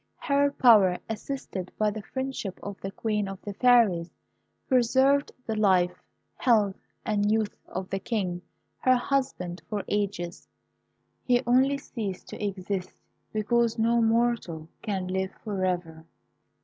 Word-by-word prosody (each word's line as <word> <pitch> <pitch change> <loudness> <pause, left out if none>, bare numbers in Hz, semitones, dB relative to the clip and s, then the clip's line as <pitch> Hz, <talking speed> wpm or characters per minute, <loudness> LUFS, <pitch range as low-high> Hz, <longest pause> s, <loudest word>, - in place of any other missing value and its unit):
Her 285 -1 +2
power, 210 -9 +6
assisted 220 -5 -5
by 215 -1 +2
the 215 +1 -6
friendship 260 -5 -4
of 200 -1 -7
the 195 - -3
Queen 210 0 -1
of 195 -1 -6
the 205 - -5
Fairies, 210 -7 +4 0.6
preserved 265 +2 +3
the 220 - -2
life, 190 -4 +2 0.4
health, 210 -6 +3 0.3
and 205 -1 +1
youth 220 -1 0
of 185 0 -5
the 195 - -1
King, 185 -6 -2 0.4
her 255 0 +4
husband, 245 -9 -1
for 210 -2 -2
ages. 200 -4 -2 0.8
He 245 0 +2
only 265 +3 +4
ceased 215 -8 -6
to - - -7
exist 195 -2 -3 0.4
because 230 +2 +1
no 230 +1 +3
mortal 225 -9 +1
can 195 -4 -2
live 190 +1 -2
for 200 -4 -2
ever. 165 -3 -2
210 Hz, 135 wpm, -27 LUFS, 190-240 Hz, 0.8 s, power